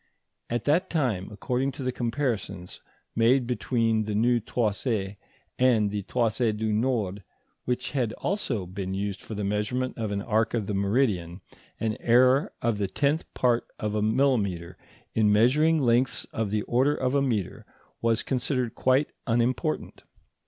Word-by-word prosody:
At 120 Hz, -1 st, -1 dB
that 170 Hz, +6 st, +2 dB
time, 125 Hz, -, -1 dB
according 125 Hz, +5 st, -1 dB
to 135 Hz, 0 st, -7 dB
the 130 Hz, -, 0 dB
comparisons 120 Hz, -7 st, -3 dB, 0.3 s
made 120 Hz, +3 st, +4 dB
between 115 Hz, -2 st, +1 dB
this 105 Hz, -1 st, -2 dB
new 120 Hz, +3 st, +3 dB
toise 105 Hz, -2 st, -1 dB, 0.5 s
and 115 Hz, -5 st, +3 dB
the 105 Hz, 0 st, -2 dB
Toise 115 Hz, +1 st, 0 dB
du 110 Hz, 0 st, -1 dB
Nord, 105 Hz, -4 st, 0 dB, 0.4 s
which 125 Hz, 0 st, -2 dB
had 125 Hz, -5 st, 0 dB
also 130 Hz, -, -2 dB
been 95 Hz, +1 st, -4 dB
used 100 Hz, 0 st, -3 dB
for 110 Hz, -, -7 dB
the 105 Hz, -, -3 dB
measurement 105 Hz, +6 st, -1 dB
of 110 Hz, -2 st, -1 dB
an 100 Hz, -1 st, -2 dB
arc 110 Hz, 0 st, +1 dB
of 110 Hz, -3 st, -1 dB
the 105 Hz, -, -3 dB
meridian, 100 Hz, -4 st, 0 dB, 0.4 s
an 110 Hz, -1 st, -1 dB
error 130 Hz, +3 st, +4 dB
of 115 Hz, -3 st, +1 dB
the 100 Hz, -, 0 dB
tenth 145 Hz, -, 0 dB
part 120 Hz, -1 st, +2 dB
of 105 Hz, -1 st, -3 dB
a 105 Hz, -, 0 dB
millimetre 105 Hz, -7 st, +1 dB, 0.4 s
in 110 Hz, -2 st, +3 dB
measuring 150 Hz, +10 st, +4 dB
lengths 120 Hz, -1 st, +2 dB
of 110 Hz, -2 st, -1 dB
the 105 Hz, 0 st, 0 dB
order 135 Hz, +5 st, +2 dB
of 130 Hz, -2 st, -1 dB
a 140 Hz, -, +3 dB
metre 115 Hz, -9 st, -1 dB, 0.4 s
was 115 Hz, -1 st, +1 dB
considered 125 Hz, -2 st, -1 dB
quite 130 Hz, +3 st, +2 dB, 0.2 s
unimportant. 125 Hz, +7 st, 0 dB
115 Hz, 155 wpm, -27 LUFS, 105-130 Hz, 0.5 s, made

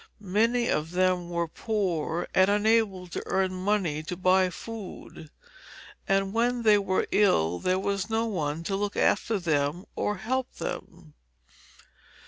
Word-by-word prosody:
Many 235 Hz, +3 st, +3 dB
of 150 Hz, +1 st, 0 dB
them 180 Hz, -1 st, +1 dB
were 170 Hz, -1 st, -1 dB
poor 175 Hz, -4 st, -2 dB
and 190 Hz, +1 st, +4 dB
unable 210 Hz, -2 st, +2 dB
to 175 Hz, -, -5 dB
earn 190 Hz, -1 st, +1 dB
money 185 Hz, -5 st, 0 dB
to 175 Hz, +3 st, -6 dB
buy 185 Hz, 0 st, +3 dB
food, 195 Hz, -5 st, -9 dB, 0.8 s
and 195 Hz, 0 st, +1 dB
when 240 Hz, +1 st, +1 dB
they 210 Hz, -2 st, +6 dB
were 190 Hz, -1 st, 0 dB
ill 90 Hz, -, +3 dB
there 185 Hz, 0 st, +1 dB
was 200 Hz, +1 st, -2 dB
no 225 Hz, +1 st, +1 dB
one 165 Hz, -7 st, -2 dB
to 195 Hz, +3 st, -2 dB
look 205 Hz, +1 st, -2 dB
after 220 Hz, +2 st, +2 dB
them 160 Hz, 0 st, -1 dB
or 210 Hz, -, -1 dB
help 255 Hz, +6 st, -2 dB
them. 75 Hz, -2 st, -7 dB
190 Hz, 140 wpm, -27 LUFS, 175-210 Hz, 0.8 s, they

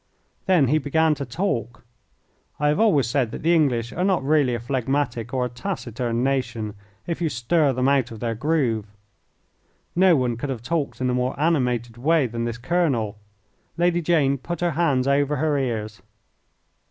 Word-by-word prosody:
Then 170 Hz, -9 st, +4 dB
he 155 Hz, +3 st, +3 dB
began 160 Hz, +2 st, +2 dB
to 140 Hz, -2 st, -5 dB
talk. 120 Hz, -, -3 dB, 0.7 s
I 150 Hz, 0 st, +2 dB
have 150 Hz, -, +1 dB
always 185 Hz, -, +4 dB
said 120 Hz, 0 st, 0 dB
that -, -, -8 dB
the 170 Hz, +2 st, +3 dB
English 125 Hz, -8 st, +1 dB
are 180 Hz, -, -1 dB
not 190 Hz, -7 st, +1 dB
really 140 Hz, -4 st, +2 dB
a -, -, -3 dB
phlegmatic 125 Hz, -1 st, -2 dB
or 130 Hz, -2 st, 0 dB
a -, -, -3 dB
taciturn 120 Hz, -, -3 dB
nation 120 Hz, -6 st, -1 dB, 0.3 s
if 170 Hz, 0 st, -4 dB
you 165 Hz, -, +1 dB
stir 140 Hz, +4 st, +1 dB
them 130 Hz, 0 st, 0 dB
out 135 Hz, -4 st, +2 dB
of 110 Hz, -, -9 dB
their 115 Hz, 0 st, -2 dB
groove. 120 Hz, -5 st, 0 dB, 1.1 s
No 185 Hz, -1 st, +5 dB
one 125 Hz, -4 st, 0 dB
could 140 Hz, +4 st, -4 dB
have 120 Hz, -4 st, -4 dB
talked 145 Hz, 0 st, -2 dB
in 130 Hz, -, +1 dB
a -, -, 0 dB
more 125 Hz, +2 st, -1 dB
animated 125 Hz, -7 st, 0 dB
way 155 Hz, +3 st, +2 dB
than 115 Hz, 0 st, -3 dB
this 120 Hz, 0 st, -3 dB
colonel. 120 Hz, -, 0 dB, 0.6 s
Lady 175 Hz, 0 st, +2 dB
Jane 150 Hz, -5 st, +2 dB
put 170 Hz, +5 st, -5 dB
her 175 Hz, -1 st, +1 dB
hands 140 Hz, -5 st, +1 dB
over 140 Hz, +1 st, +2 dB
her 150 Hz, +1 st, 0 dB
ears. 110 Hz, -5 st, -3 dB
135 Hz, 175 wpm, -23 LUFS, 120-160 Hz, 1.1 s, No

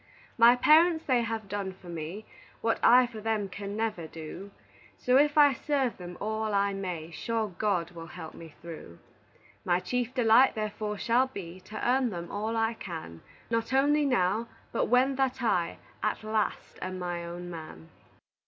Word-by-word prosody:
My 235 Hz, +1 st, +7 dB
parents 320 Hz, +5 st, +5 dB
they 250 Hz, -3 st, +3 dB
have 225 Hz, -2 st, -3 dB
done 195 Hz, -1 st, -3 dB
for 185 Hz, -1 st, -16 dB
me 170 Hz, +5 st, -6 dB, 0.4 s
What 225 Hz, -, +1 dB
I 250 Hz, +1 st, +7 dB
for 230 Hz, -3 st, -8 dB
them 215 Hz, -2 st, 0 dB
can 200 Hz, +2 st, -6 dB
never 215 Hz, -7 st, -2 dB
do, 165 Hz, +5 st, -8 dB, 0.5 s
So 250 Hz, -, +2 dB
if 295 Hz, +1 st, +3 dB
I 290 Hz, -2 st, +7 dB
serve 270 Hz, -3 st, -1 dB
them 180 Hz, -1 st, -8 dB
all 215 Hz, 0 st, -2 dB
I 200 Hz, 0 st, +2 dB
may, 180 Hz, -4 st, -5 dB
Sure 220 Hz, +7 st, -2 dB
God 180 Hz, -2 st, -1 dB
will 165 Hz, -1 st, -9 dB
help 165 Hz, -2 st, -9 dB
me 165 Hz, -2 st, -12 dB
through. 160 Hz, -, -9 dB, 0.7 s
My 175 Hz, 0 st, +2 dB
chief 245 Hz, +4 st, -2 dB
delight, 245 Hz, +1 st, +5 dB
therefore, 210 Hz, -1 st, -3 dB
shall 240 Hz, +5 st, +2 dB
be 185 Hz, -8 st, -8 dB
To 215 Hz, -, -4 dB
earn 255 Hz, 0 st, +3 dB
them 175 Hz, -4 st, -6 dB
all 215 Hz, +3 st, -2 dB
I 225 Hz, +1 st, +1 dB
can, 160 Hz, -, -8 dB, 0.3 s
Not 230 Hz, +2 st, 0 dB
only 290 Hz, +3 st, +4 dB
now, 230 Hz, -4 st, +1 dB, 0.2 s
but -, -, +1 dB
when 260 Hz, +2 st, +3 dB
that 265 Hz, -1 st, 0 dB
I 175 Hz, -7 st, +1 dB, 0.2 s
At 215 Hz, 0 st, -1 dB
last 215 Hz, -1 st, -2 dB
am 185 Hz, 0 st, -4 dB
my 175 Hz, -1 st, -3 dB
own 175 Hz, +1 st, -7 dB
man. 155 Hz, -, -9 dB
215 Hz, 170 wpm, -29 LUFS, 175-240 Hz, 0.7 s, My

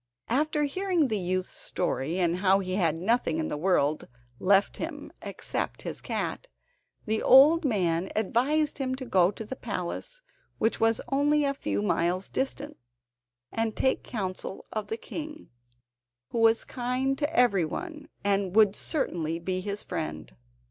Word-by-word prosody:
After 300 Hz, +4 st, +1 dB
hearing 345 Hz, 0 st, +1 dB
the 215 Hz, -2 st, 0 dB
youth's 185 Hz, +1 st, -1 dB
story, 165 Hz, -2 st, -2 dB
and 175 Hz, -1 st, +1 dB
how 190 Hz, 0 st, +4 dB
he 185 Hz, -2 st, -3 dB
had 170 Hz, -5 st, +2 dB
nothing 230 Hz, -, +1 dB
in 320 Hz, -1 st, -1 dB
the -, -, -2 dB
world 155 Hz, -3 st, +1 dB, 0.3 s
left 195 Hz, +1 st, +3 dB
him -, -, -6 dB
except -, -, -3 dB
his -, -, -5 dB
cat, -, -, -3 dB, 0.6 s
the 220 Hz, 0 st, 0 dB
old 300 Hz, +6 st, +7 dB
man 185 Hz, -, +1 dB
advised 275 Hz, +9 st, +1 dB
him 260 Hz, -1 st, -1 dB
to 260 Hz, 0 st, -7 dB
go 185 Hz, -6 st, +4 dB
to 215 Hz, +2 st, -7 dB
the 265 Hz, -, -6 dB
palace, 240 Hz, -, -5 dB, 0.3 s
which 225 Hz, -, +1 dB
was 225 Hz, 0 st, +3 dB
only 290 Hz, +2 st, +3 dB
a 275 Hz, -, +1 dB
few 100 Hz, -, -2 dB
miles 175 Hz, -, 0 dB
distant, 275 Hz, +2 st, -3 dB, 0.7 s
and 225 Hz, -1 st, -1 dB
take 265 Hz, -, +1 dB
counsel 190 Hz, -3 st, -5 dB
of 215 Hz, -2 st, -3 dB
the 225 Hz, -, -3 dB
king, 310 Hz, +5 st, -8 dB, 0.8 s
who 235 Hz, -, -2 dB
was 225 Hz, 0 st, +4 dB
kind 255 Hz, +2 st, -1 dB
to 295 Hz, +1 st, 0 dB
everyone, 245 Hz, -, 0 dB
and 195 Hz, -2 st, 0 dB
would 210 Hz, -2 st, +6 dB
certainly 165 Hz, -, -1 dB
be 185 Hz, +2 st, -2 dB
his 200 Hz, +2 st, -3 dB
friend. 80 Hz, -, -5 dB
220 Hz, 150 wpm, -28 LUFS, 185-275 Hz, 0.8 s, old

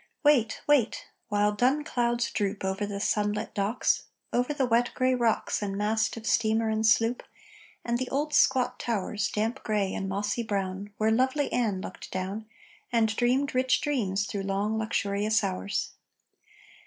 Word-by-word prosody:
Wait!... 275 Hz, -7 st, +3 dB
Wait!... 285 Hz, -6 st, +2 dB, 0.2 s
While 205 Hz, 0 st, +2 dB
dun 255 Hz, +8 st, +2 dB
clouds 240 Hz, -3 st, 0 dB
droop 200 Hz, -1 st, -2 dB
Over 190 Hz, +2 st, -1 dB
the 200 Hz, -1 st, -4 dB
sunlit 210 Hz, 0 st, 0 dB
docks, 205 Hz, +4 st, 0 dB, 0.3 s
Over 245 Hz, +4 st, +1 dB
the 280 Hz, -3 st, +1 dB
wet 240 Hz, 0 st, +2 dB
gray 255 Hz, 0 st, +2 dB
rocks 235 Hz, -4 st, +1 dB
And 200 Hz, -1 st, -3 dB
mast 220 Hz, +2 st, 0 dB
of 225 Hz, -, -8 dB
steamer 225 Hz, -1 st, +2 dB
and 220 Hz, 0 st, 0 dB
sloop, 225 Hz, +2 st, +3 dB, 0.6 s
And 235 Hz, 0 st, 0 dB
the 255 Hz, -, -3 dB
old 295 Hz, +2 st, -1 dB
squat 260 Hz, -3 st, +3 dB
towers, 210 Hz, -2 st, -1 dB
Damp 225 Hz, +5 st, -2 dB
gray 205 Hz, -3 st, 0 dB
and 195 Hz, -, -3 dB
mossy 205 Hz, +4 st, -1 dB
brown, 200 Hz, -2 st, -3 dB
Where 220 Hz, +1 st, +2 dB
lovely 260 Hz, +5 st, +1 dB
Ann 210 Hz, -6 st, 0 dB
looked -, -, -8 dB
down 195 Hz, +4 st, -4 dB, 0.4 s
And 220 Hz, -2 st, +2 dB
dreamed 255 Hz, +4 st, +1 dB
rich 255 Hz, 0 st, +2 dB
dreams 200 Hz, -9 st, 0 dB
through 200 Hz, -1 st, -4 dB
long 200 Hz, +3 st, -1 dB
luxurious 215 Hz, 0 st, 0 dB
hours. 95 Hz, +2 st, -2 dB
220 Hz, 155 wpm, -28 LUFS, 205-245 Hz, 0.6 s, Wait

